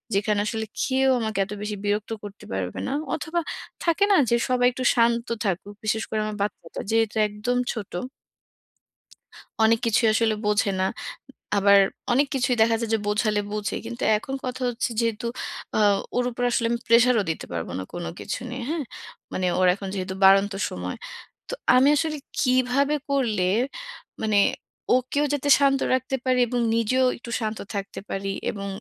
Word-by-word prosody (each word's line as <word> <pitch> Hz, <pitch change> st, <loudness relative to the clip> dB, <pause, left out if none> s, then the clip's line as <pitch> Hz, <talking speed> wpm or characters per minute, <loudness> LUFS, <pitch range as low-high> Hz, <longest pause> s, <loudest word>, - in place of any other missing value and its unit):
যেখানে 205 Hz, +1 st, +1 dB
আসলে 220 Hz, 0 st, -2 dB, 0.2 s
কেউ 265 Hz, 0 st, +2 dB
আমাকে 220 Hz, -3 st, -2 dB
এত 200 Hz, -, -13 dB
বেশি 210 Hz, 0 st, -3 dB
বিরক্ত 210 Hz, +2 st, -1 dB
করতে 205 Hz, 0 st, -10 dB
পারবে 95 Hz, -2 st, -3 dB
না। 265 Hz, -, -2 dB, 0.2 s
অথবা 320 Hz, +2 st, -2 dB, 0.4 s
থাকে 340 Hz, +4 st, +2 dB
না? -, -, +6 dB
যে 235 Hz, -, +4 dB
সবাই 250 Hz, -1 st, +3 dB
একটু 255 Hz, +1 st, -5 dB
শান্ত 235 Hz, 0 st, +2 dB, 0.2 s
থাকুক। 195 Hz, +2 st, -2 dB
বিশেষ 220 Hz, +1 st, 0 dB
করে 220 Hz, -, -1 dB
আমার 215 Hz, -1 st, -4 dB
বাচ্চাটা 190 Hz, -5 st, -4 dB
যেহেতু 225 Hz, -1 st, +2 dB
একদম 210 Hz, +4 st, -2 dB, 0.2 s
ছোট। 215 Hz, -5 st, -7 dB, 1.7 s
অনেক 225 Hz, +1 st, +5 dB
কিছুই 225 Hz, 0 st, +3 dB
আসলে 225 Hz, -1 st, +2 dB
বোঝে 210 Hz, -1 st, +2 dB
না। -, -, +2 dB, 0.7 s
আবার 200 Hz, 0 st, +6 dB, 0.3 s
অনেক 275 Hz, +3 st, +3 dB
কিছুই 255 Hz, -1 st, +1 dB
দেখা 225 Hz, 0 st, +4 dB
যায় 225 Hz, -, -2 dB
যে -, -, +4 dB
বোঝালে 210 Hz, 0 st, +1 dB
বোঝে। 210 Hz, 0 st, -2 dB
কিন্তু 235 Hz, +1 st, -6 dB
এখন 265 Hz, +5 st, -7 dB
কথা 255 Hz, +1 st, -4 dB
হচ্ছে 245 Hz, +1 st, -2 dB
যেহেতু, 230 Hz, 0 st, -1 dB, 0.5 s
আ -, -, +2 dB, 0.4 s
ওর 245 Hz, -, +2 dB
উপর 245 Hz, +1 st, -4 dB
আসলে 235 Hz, -, +1 dB
আমি 235 Hz, -, 0 dB
প্রেশারও 230 Hz, -1 st, +5 dB
দিতে 160 Hz, -, -3 dB
পারব 85 Hz, -1 st, -3 dB
না -, -, -3 dB
কোন 175 Hz, 0 st, -5 dB
কিছু -, -, -4 dB
নিয়ে। 250 Hz, 0 st, -5 dB
হ্যাঁ? 320 Hz, -2 st, -1 dB, 0.5 s
মানে 185 Hz, -, -1 dB
ওর 185 Hz, -, +4 dB
এখন 200 Hz, -1 st, -7 dB
যেহেতু 190 Hz, 0 st, -3 dB
বাড়ন্ত 195 Hz, +1 st, +6 dB, 0.2 s
সময়। -, -, -5 dB, 0.5 s
তো -, -, -3 dB, 0.2 s
আমি 260 Hz, +2 st, +6 dB
আসলে 310 Hz, 0 st, -1 dB, 0.2 s
কিভাবে 255 Hz, +3 st, +2 dB
করলে 235 Hz, -9 st, +1 dB, 0.8 s
মানে 215 Hz, -2 st, +2 dB, 0.6 s
ওকেও 260 Hz, +4 st, +1 dB
যাতে 285 Hz, 0 st, -1 dB
শান্ত 275 Hz, -1 st, +3 dB
রাখতে 260 Hz, +1 st, 0 dB
পারি 255 Hz, -1 st, +2 dB
এবং 245 Hz, +1 st, -1 dB, 0.2 s
নিজেও 255 Hz, +3 st, +2 dB
একটু 235 Hz, 0 st, -9 dB
শান্ত 220 Hz, -1 st, -3 dB, 0.2 s
থাকতে 200 Hz, 0 st, -4 dB
পারি 195 Hz, 0 st, -3 dB, 0.2 s
এবং 200 Hz, -1 st, -6 dB
230 Hz, 165 wpm, -24 LUFS, 205-255 Hz, 1.7 s, না